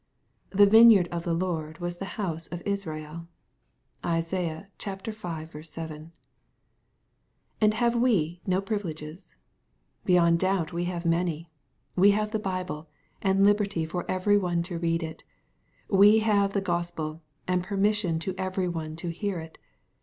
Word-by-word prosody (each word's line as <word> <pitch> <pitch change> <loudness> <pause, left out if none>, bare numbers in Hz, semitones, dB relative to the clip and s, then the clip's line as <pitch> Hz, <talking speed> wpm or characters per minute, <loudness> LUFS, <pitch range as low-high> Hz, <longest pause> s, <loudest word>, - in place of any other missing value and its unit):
The 205 +1 +6
vineyard 220 -3 +7
of 170 -1 -4
the 170 - 0
Lord 160 -3 -2
was 175 0 -4
the 195 - -4
j - - -8
house 165 -6 -3
of 175 0 -7
Israel. 165 -5 -4 0.8
(Isai. 165 0 -2 0.2
v. 180 -7 -6
7.) 160 0 -8 1.5
And 215 0 +5
have 235 +1 +2
we 180 -9 +1
no 185 +1 +2
privileges? 170 - -5 0.7
Beyond 170 -2 +4
doubt 185 -2 0
we 175 +1 -1
have 175 -1 -4
many. 165 -1 0 0.4
We 195 +2 +6
have 215 0 -1
the 220 - -1
Bible, 185 -6 -4 0.3
and 195 0 +3
liberty 200 -4 +2
for 175 +2 -5
every 205 +2 +3
one 175 -3 0
to 170 -1 -4
read 165 0 0
it. 160 -1 -7 0.6
We 205 +2 +6
have 200 -2 +3
the 200 - +1
Gospel, 170 -3 -3 0.3
and 180 0 +1
permission 200 -2 +1
to 190 +3 -2
every 185 0 -1
one 160 -2 -4
to 165 +1 -4
hear 190 +3 -3
it.' 160 0 -11
180 Hz, 145 wpm, -27 LUFS, 165-200 Hz, 1.5 s, vineyard